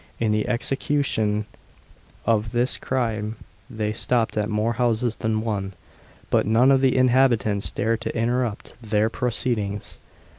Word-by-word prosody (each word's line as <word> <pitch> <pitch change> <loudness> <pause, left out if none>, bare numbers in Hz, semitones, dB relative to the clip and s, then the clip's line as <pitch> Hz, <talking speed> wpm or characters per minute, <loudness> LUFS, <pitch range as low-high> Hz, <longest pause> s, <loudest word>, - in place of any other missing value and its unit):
In 110 -2 +1
the 105 0 0
execution 120 -4 0 0.8
of 110 0 +1
this 120 +2 +2
crime 110 -4 -2 0.3
they 105 -1 -2
stopped 115 0 0
at 105 0 0
more 110 +2 0
houses 120 0 0
than 110 0 -1
one, 100 -4 -3 0.6
but - - +2
none 120 +5 +5
of 135 -1 +4
the 130 -1 +3
inhabitants 120 -5 +3
dared 115 +1 -1
interrupt 120 -1 -1
their 110 0 +1
proceedings. 110 -5 -2
115 Hz, 125 wpm, -23 LUFS, 105-125 Hz, 0.8 s, none